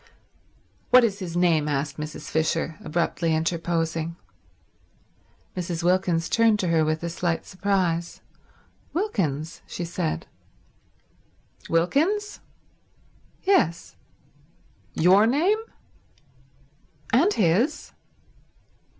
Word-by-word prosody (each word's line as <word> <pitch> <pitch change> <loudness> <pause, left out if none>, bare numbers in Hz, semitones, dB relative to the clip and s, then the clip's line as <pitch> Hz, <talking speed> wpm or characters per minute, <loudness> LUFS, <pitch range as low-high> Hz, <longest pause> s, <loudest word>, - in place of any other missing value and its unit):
"What 255 0 +7
is 205 -4 0
his 175 -3 -4
name?" 165 -4 +3
asked 140 0 -2
Mrs. 150 0 -6
Fisher, 160 0 0
abruptly 165 0 0
interposing. 165 0 -1 1.4
Mrs. 175 -2 -3
Wilkins 175 -2 +1
turned 230 -2 +3
to 180 - -1
her 165 -1 +3
with 155 +1 -1
a - - -1
slight 170 0 -2
surprise. 185 -3 -1 0.7
"Wilkins," 165 - -2
she 175 - -5
said. 170 - -3 1.4
"Wilkins?" 320 - +1 1.0
"Yes," 170 - +1 1.0
"Your 190 +6 +5
name?" 340 - +2 1.5
"And 320 - +4
his." 215 - +1
170 Hz, 85 wpm, -25 LUFS, 165-205 Hz, 1.5 s, What